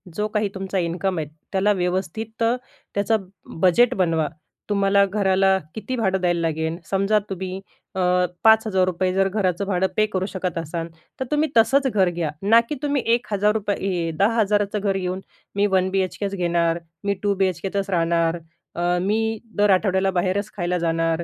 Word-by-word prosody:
जो 210 +2 0
काही 210 -1 -1
तुमचा 190 0 -3
इन्कम 180 +1 -1
आहे, 155 - -3 0.2
त्याला 200 +1 +2
व्यवस्थित 195 +5 -2
त्याचं 225 -3 -2 0.3
बजेट 190 +7 +5
बनवा. 165 -4 +1 0.4
तुम्हाला 200 -1 +3
घराला 195 -1 +2 0.2
किती 220 +4 -4
भाडं 190 -5 0
द्यायला 175 -1 +1
लागेल, 160 0 -1
समजा 195 +2 +2
तुम्ही 190 0 -5 0.3
अ, 190 - 0 0.4
₹5,000 190 -5 +3
जर 195 0 +2
घराचं 190 -2 0
भाडं 190 -1 +1
पे 215 - +4
करू 185 0 -1
शकत 185 -3 -4
असाल, 165 +1 -4 0.3
तर 260 - -1
तुम्ही 300 +1 +2
तसंच 265 +5 +4
घर 195 -7 +2
घ्या, 170 -3 -2
ना 220 +4 +6
की 300 - -2
तुम्ही 285 -2 0
₹1,000 205 -6 -1
10,000 205 0 +3
चं 210 - 0
घर 195 -1 0
घेऊन, 185 0 -2 0.4
मी 200 0 +3
वन 185 0 +2
बीएचकेच 195 +1 -1
घेणार, 170 -2 +1 0.2
मी 200 0 +1
टू 200 -1 +2
बीएचकेतच 190 +2 -1
राहणार, 170 -1 +1 0.4
अ, 175 +1 +1
मी 205 +4 +1 0.4
दर 205 0 +4
आठवड्याला 190 0 +2
बाहेरच 190 +3 -1
खायला 180 -1 0
जाणार. 165 0 0
190 Hz, 155 wpm, -22 LUFS, 180-210 Hz, 0.4 s, ना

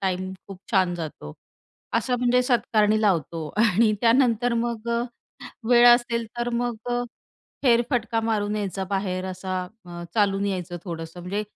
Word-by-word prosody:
Time 185 0 -2 0.2
खूप 195 - -9
छान 185 -3 +3
जातो. 155 - -7 0.6
असं 245 +2 +1
म्हणजे 250 +1 +3
सत्कारणी 215 -3 +2
लावतो 165 -5 0 0.2
आणि 215 0 +4
त्यानंतर 240 0 +3
मग 235 -1 -4
अ, 235 0 +1 0.7
वेळ 240 0 +7
असेल 235 -1 -2
तर 240 0 -1
मग 240 -1 -1
अ, 245 0 0 0.6
फेरफटका 235 -2 +2
मारून 215 -2 -1
यायचा 195 -2 -3
बाहेर 190 -2 -1
असा 185 0 -3 0.2
अ, 175 0 -8
चालून 200 -2 +2
यायचं 180 -3 -3
थोडंसं 165 0 -7
म्हणजे, 200 +4 -3
215 Hz, 140 wpm, -24 LUFS, 185-235 Hz, 0.7 s, वेळ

